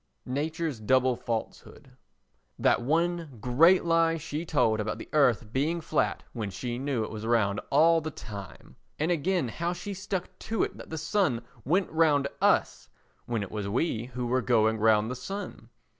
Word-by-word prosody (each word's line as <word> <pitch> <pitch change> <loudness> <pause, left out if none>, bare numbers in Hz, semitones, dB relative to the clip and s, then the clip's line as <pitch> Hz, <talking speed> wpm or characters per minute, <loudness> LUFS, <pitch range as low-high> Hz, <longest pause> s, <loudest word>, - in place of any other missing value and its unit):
Nature's 150 0 -2
Double 130 +3 +3
Falsehood 115 -1 -6 0.7
That - - +3
one 165 0 0
great 165 - +4
lie 165 -1 +3
she 155 0 -4
told 110 -8 +2
about 105 +1 -2
the - - -9
earth 120 -7 +2
being 155 +6 0
flat 155 -1 -1
when 110 -4 -3
she 120 +4 -4
knew 135 -4 -1
it - - -6
was 110 -1 -6
round 110 -3 +1
all 165 +3 +5
the 155 - -4
time! 100 -9 -10 0.2
And 160 +3 0
again 175 -2 +1
how 170 +8 -2
she 180 +3 -6
stuck 190 -1 -3
to 225 -3 -1
it - - -3
that - - -11
the 160 - -5
sun 155 - 0 0.2
went 180 +6 +1
round 150 -4 +3
us - - +2 0.4
when 115 -3 -1
it 100 - -8
was 105 -2 -3
we 120 0 -1
who 125 0 -5
were 130 +2 +1
going 110 -3 +2
round 110 +1 +3
the - - -3
sun! 195 +12 -7
140 Hz, 175 wpm, -28 LUFS, 115-165 Hz, 0.7 s, all